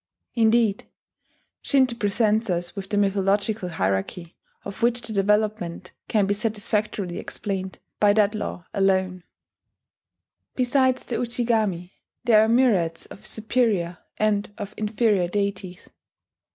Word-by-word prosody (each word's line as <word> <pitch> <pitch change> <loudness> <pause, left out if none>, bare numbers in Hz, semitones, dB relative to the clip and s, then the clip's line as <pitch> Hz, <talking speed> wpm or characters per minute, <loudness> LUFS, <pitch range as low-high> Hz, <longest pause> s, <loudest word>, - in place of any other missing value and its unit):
Indeed, 225 -2 +2 0.7
Shinto 260 -4 +3
presents 215 0 +1
us 175 +1 -2
with 195 -1 -7
a 205 - +1
mythological 200 0 +1
hierarchy 130 - -2 0.3
of 200 +2 -8
which 240 +1 +2
the 225 -1 -5
development 205 -3 0 0.2
can 210 -3 +2
be 200 - +1
satisfactorily 210 -3 -2
explained 190 -2 -4 0.2
by 205 -1 +5
that 210 0 +3
law 210 -5 -5
alone. 190 -2 +1 1.3
Besides 260 0 +2
the 240 - -3
Ujigami, 220 -7 -1 0.3
there 225 -3 +5
are 220 - +1
myriads 205 -10 +2
of - - -8
superior 215 -6 0 0.2
and 210 -1 0
of 205 -3 -6
inferior 210 -3 +1
deities. 190 -1 -4
205 Hz, 115 wpm, -24 LUFS, 190-225 Hz, 1.3 s, by